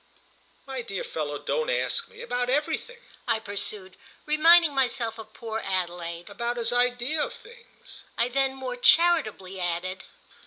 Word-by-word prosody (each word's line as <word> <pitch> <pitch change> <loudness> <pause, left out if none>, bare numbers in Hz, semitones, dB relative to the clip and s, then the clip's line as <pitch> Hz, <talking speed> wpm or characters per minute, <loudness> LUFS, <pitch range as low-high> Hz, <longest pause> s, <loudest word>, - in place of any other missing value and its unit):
"My 265 -2 -4
dear 195 -5 -4
fellow, 145 -2 -3
don't 475 - -1
ask - - -1
me! 475 +1 -11
About 245 - -1
everything!" 315 - -1 0.3
I - - +2
pursued, 205 -2 -1 0.3
reminding 320 +1 +6
myself 245 -4 0
of 215 -1 -11
poor 225 -1 -4
Adelaide. 175 -2 -3
"About 235 +4 -3
his 235 0 -1
ideas 245 +5 +1
of - - -8
things," 470 +2 -15 0.2
I 235 - +2
then 270 +1 0
more 255 -2 -5
charitably 245 - +3
added. 180 +2 -3
245 Hz, 145 wpm, -26 LUFS, 195-300 Hz, 0.3 s, reminding